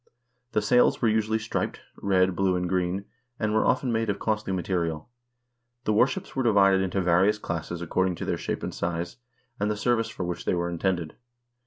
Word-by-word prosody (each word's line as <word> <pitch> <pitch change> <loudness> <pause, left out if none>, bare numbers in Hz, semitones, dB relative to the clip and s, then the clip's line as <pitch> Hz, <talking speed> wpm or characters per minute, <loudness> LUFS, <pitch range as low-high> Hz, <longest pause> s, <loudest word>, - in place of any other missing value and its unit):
The 105 - +1
sails 125 +4 +4
were 115 - +3
usually 110 0 +1
striped, 110 0 -3 0.2
red, 95 -2 +2
blue, 95 -1 +2
and 90 0 -1
green, 90 +2 -1 0.3
and 110 -1 0
were 110 - +3
often 130 -1 +2
made 115 -1 0
of 100 - 0
costly 105 -1 -1
material. 85 -2 -2 0.7
The 110 - +1
warships 125 +5 +1
were 135 - +1
divided 100 -5 +4
into 95 +1 0
various 90 +4 +3
classes 85 -2 -4
according 95 +2 0
to - - -5
their - - 0
shape - - -3
and - - -3
size, 85 +3 -3 0.4
and 100 +1 +1
the 105 - -1
ser 120 +3 +2
vice 115 0 -2
for 95 - -5
which 90 -1 -4
they - - +1
were 85 0 -1
intended. 85 -2 -2
95 Hz, 195 wpm, -26 LUFS, 90-110 Hz, 0.7 s, sails